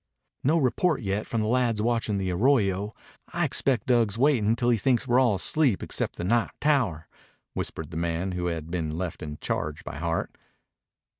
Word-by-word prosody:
"No 155 Hz, +5 st, +3 dB
report 150 Hz, +1 st, +1 dB
yet 100 Hz, +2 st, -2 dB
from 115 Hz, -, -1 dB
the 105 Hz, -, -1 dB
lads 120 Hz, -2 st, +1 dB
watchin' 115 Hz, -2 st, 0 dB
the 95 Hz, -1 st, -1 dB
arroyo. 105 Hz, -1 st, +1 dB, 0.4 s
I -, -, +1 dB
expect 130 Hz, -4 st, +1 dB
Dug's 115 Hz, -5 st, +2 dB
waitin' 120 Hz, -5 st, +3 dB
till 120 Hz, +1 st, +1 dB
he 115 Hz, -, +3 dB
thinks 125 Hz, +1 st, +1 dB
we're 120 Hz, +1 st, +4 dB
all 120 Hz, -6 st, +3 dB
asleep 125 Hz, +3 st, +1 dB
except -, -, -1 dB
the -, -, -5 dB
night 115 Hz, +5 st, +2 dB
tower," 125 Hz, -, +1 dB, 0.5 s
whispered 80 Hz, 0 st, -4 dB
the 80 Hz, -, -5 dB
man 85 Hz, +2 st, -1 dB
who 90 Hz, -1 st, -2 dB
had 80 Hz, -1 st, -4 dB
been 80 Hz, -3 st, -2 dB
left 90 Hz, -2 st, -4 dB
in 75 Hz, -1 st, -6 dB
charge 75 Hz, 0 st, -3 dB
by 75 Hz, -, -7 dB
Hart. 85 Hz, +1 st, -2 dB
105 Hz, 180 wpm, -26 LUFS, 90-125 Hz, 0.5 s, we're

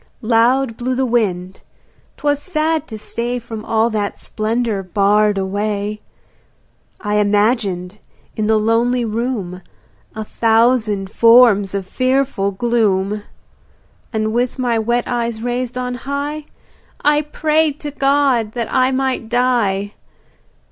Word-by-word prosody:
Loud 230 Hz, +2 st, +2 dB
blew 255 Hz, +1 st, -2 dB
the 265 Hz, +1 st, +1 dB
wind; 190 Hz, -6 st, -1 dB, 0.6 s
'twas 290 Hz, -1 st, 0 dB
sad 315 Hz, -2 st, -1 dB
to 220 Hz, -, -7 dB
stay 235 Hz, +3 st, -3 dB
From 225 Hz, -2 st, -7 dB
all 225 Hz, +1 st, +1 dB
that 205 Hz, -2 st, -2 dB
splendour 220 Hz, -1 st, -2 dB
barred 205 Hz, +2 st, +2 dB
away. 205 Hz, +2 st, -2 dB, 1.0 s
I 210 Hz, 0 st, 0 dB
imaged 205 Hz, -2 st, 0 dB, 0.4 s
in 215 Hz, -1 st, -1 dB
the 220 Hz, 0 st, +3 dB
lonely 230 Hz, +3 st, +1 dB
room 215 Hz, -5 st, -3 dB, 0.5 s
A 220 Hz, -, -4 dB
thousand 225 Hz, -3 st, +1 dB
forms 230 Hz, -5 st, +5 dB
of 195 Hz, -1 st, -3 dB
fearful 255 Hz, -3 st, 0 dB
gloom. 205 Hz, -2 st, 0 dB, 0.9 s
And 220 Hz, -1 st, -1 dB
with 245 Hz, +2 st, 0 dB
my 240 Hz, -3 st, 0 dB
wet 235 Hz, +2 st, 0 dB
eyes 235 Hz, -2 st, -2 dB
raised 245 Hz, 0 st, -2 dB
on 250 Hz, 0 st, -2 dB
high 280 Hz, +4 st, -4 dB, 0.6 s
I 295 Hz, 0 st, +4 dB
prayed 305 Hz, 0 st, 0 dB
to 295 Hz, -, -5 dB
God 275 Hz, -6 st, +1 dB
that 235 Hz, -2 st, -4 dB
I 255 Hz, 0 st, +3 dB
might 260 Hz, -3 st, -1 dB
die. 225 Hz, -5 st, +1 dB
230 Hz, 120 wpm, -18 LUFS, 210-255 Hz, 1.0 s, forms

